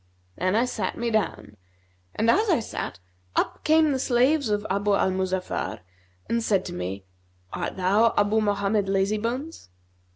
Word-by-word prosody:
Then 185 Hz, +3 st, 0 dB
I 235 Hz, +3 st, +3 dB
sat 250 Hz, -, -3 dB
me 235 Hz, 0 st, -1 dB
down 215 Hz, -2 st, -2 dB, 0.6 s
and 220 Hz, -, 0 dB
as 425 Hz, +3 st, +2 dB
I 335 Hz, -, +4 dB
sat, 220 Hz, -, -5 dB, 0.4 s
up -, -, -1 dB
came 315 Hz, -1 st, +4 dB
the 265 Hz, -, 0 dB
slaves 260 Hz, +2 st, +2 dB
of 205 Hz, 0 st, 0 dB
Abu 200 Hz, +1 st, +1 dB
al 190 Hz, -, +2 dB
Muzaffar 185 Hz, -, -2 dB, 0.5 s
and 230 Hz, 0 st, 0 dB
said 195 Hz, -4 st, +1 dB
to -, -, -6 dB
me, 95 Hz, +2 st, -5 dB, 0.5 s
'Art -, -, -4 dB
thou 205 Hz, +5 st, +3 dB
Abu 205 Hz, +2 st, +3 dB
Mohammed 205 Hz, 0 st, +1 dB
Lazybones?' 215 Hz, -, -2 dB
210 Hz, 155 wpm, -25 LUFS, 190-240 Hz, 0.6 s, I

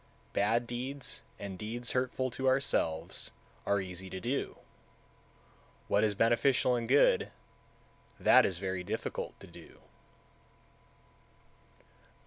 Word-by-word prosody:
163. -, -, +1 dB
Bad 115 Hz, +4 st, +2 dB
deeds, 130 Hz, +3 st, -4 dB, 0.2 s
and 100 Hz, -2 st, -7 dB
deeds 115 Hz, +3 st, -4 dB
hurtful 130 Hz, 0 st, 0 dB
to 130 Hz, +2 st, -2 dB
ourselves, 85 Hz, -11 st, +1 dB, 0.4 s
are 100 Hz, -, +3 dB
easy 95 Hz, 0 st, -6 dB
to 95 Hz, -, -5 dB
do; 125 Hz, +7 st, -2 dB, 1.3 s
what 100 Hz, +1 st, +3 dB
is 105 Hz, -1 st, +2 dB
beneficial 125 Hz, +3 st, +3 dB
and 115 Hz, -1 st, -3 dB
good, 140 Hz, +2 st, +5 dB, 0.9 s
that -, -, +7 dB
is 95 Hz, -, 0 dB
very 95 Hz, -1 st, -3 dB
difficult -, -, -4 dB
to -, -, -11 dB
do. -, -, -14 dB
115 Hz, 115 wpm, -32 LUFS, 95-125 Hz, 1.3 s, that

